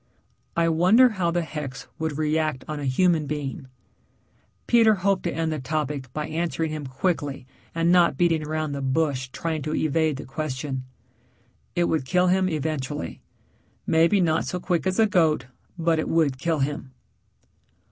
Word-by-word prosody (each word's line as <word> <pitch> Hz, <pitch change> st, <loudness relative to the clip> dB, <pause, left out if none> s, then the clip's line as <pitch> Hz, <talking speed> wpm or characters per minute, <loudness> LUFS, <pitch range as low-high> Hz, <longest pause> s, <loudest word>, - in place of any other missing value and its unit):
"I 170 Hz, 0 st, +3 dB
wonder 185 Hz, +10 st, +5 dB
how 190 Hz, -6 st, -1 dB
the 170 Hz, 0 st, 0 dB
hex 150 Hz, -4 st, -6 dB
would 160 Hz, -2 st, -2 dB
react 155 Hz, -3 st, 0 dB
on 155 Hz, -1 st, -4 dB
a 145 Hz, -, -4 dB
human 155 Hz, +3 st, +2 dB
being?" 140 Hz, -2 st, -4 dB, 1.0 s
Peter 225 Hz, -3 st, +5 dB
hoped 195 Hz, 0 st, +1 dB
to 170 Hz, -, 0 dB
end 165 Hz, -1 st, -1 dB
the 155 Hz, -, -2 dB
topic 140 Hz, -1 st, -3 dB
by 150 Hz, +3 st, -3 dB
answering 165 Hz, 0 st, -2 dB
him 150 Hz, -3 st, -5 dB
quickly 145 Hz, -1 st, -2 dB, 0.3 s
and 165 Hz, +1 st, +2 dB
not 175 Hz, -6 st, +4 dB
beating 165 Hz, -2 st, +2 dB
around 155 Hz, 0 st, -2 dB
the 140 Hz, 0 st, -4 dB
bush 135 Hz, -1 st, 0 dB
trying 160 Hz, +1 st, -3 dB
to 155 Hz, +2 st, -2 dB
evade 155 Hz, -1 st, +1 dB
the -, -, -7 dB
question. 135 Hz, -2 st, -4 dB, 0.9 s
"It 175 Hz, -, +2 dB
would 160 Hz, -5 st, 0 dB
kill 180 Hz, +5 st, +2 dB
him 185 Hz, 0 st, +2 dB
eventually. 145 Hz, -, -3 dB, 0.6 s
Maybe 165 Hz, +5 st, +4 dB
not 165 Hz, -3 st, +2 dB
so 180 Hz, -, -3 dB
quick 180 Hz, 0 st, -1 dB
as 185 Hz, -, 0 dB
the 225 Hz, -, +5 dB
goat, 160 Hz, -, +2 dB, 0.3 s
but 165 Hz, -1 st, +1 dB
it -, -, -2 dB
would 150 Hz, -6 st, +2 dB
kill 165 Hz, +2 st, 0 dB
him." 135 Hz, -1 st, -3 dB
155 Hz, 165 wpm, -25 LUFS, 145-170 Hz, 1.0 s, wonder